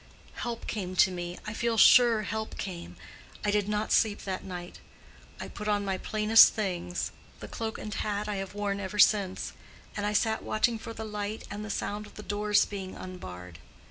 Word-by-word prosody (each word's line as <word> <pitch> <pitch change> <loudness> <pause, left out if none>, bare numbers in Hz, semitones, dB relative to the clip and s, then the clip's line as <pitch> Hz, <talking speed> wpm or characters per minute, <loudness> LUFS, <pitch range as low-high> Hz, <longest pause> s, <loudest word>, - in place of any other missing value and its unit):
Help 235 -1 -5
came 185 -4 -4
to 185 - +5
me. 175 0 -5
I 210 - -4
feel 230 0 0
sure 230 -2 +7
help 220 +1 -4
came. 180 -3 -6 0.5
I 205 - +2
did 205 0 +1
not 210 +1 -1
sleep 215 -2 +3
that 190 -1 -4
night. 180 -2 -7 0.6
I - - -5
put 210 - -7
on 205 -1 +1
my 190 -1 -1
plainest 215 +1 +6
things—the 180 -4 -4
cloak 225 -1 -4
and 210 - -6
hat 210 -1 -2
I 210 -1 -2
have 195 +1 -5
worn 200 -1 -1
ever 200 +1 -5
since; 200 -2 +3 0.4
and 205 - -3
I 210 0 0
sat 220 +1 +1
watching 225 +1 +1
for 230 0 -8
the 220 - -5
light 210 0 -4
and 205 +1 -5
the 215 - -7
sound 210 +1 -3
of - - -17
the 210 - -8
doors 205 0 +2
being 195 -2 -6
unbarred. 90 - -9
205 Hz, 190 wpm, -29 LUFS, 190-215 Hz, 0.6 s, sure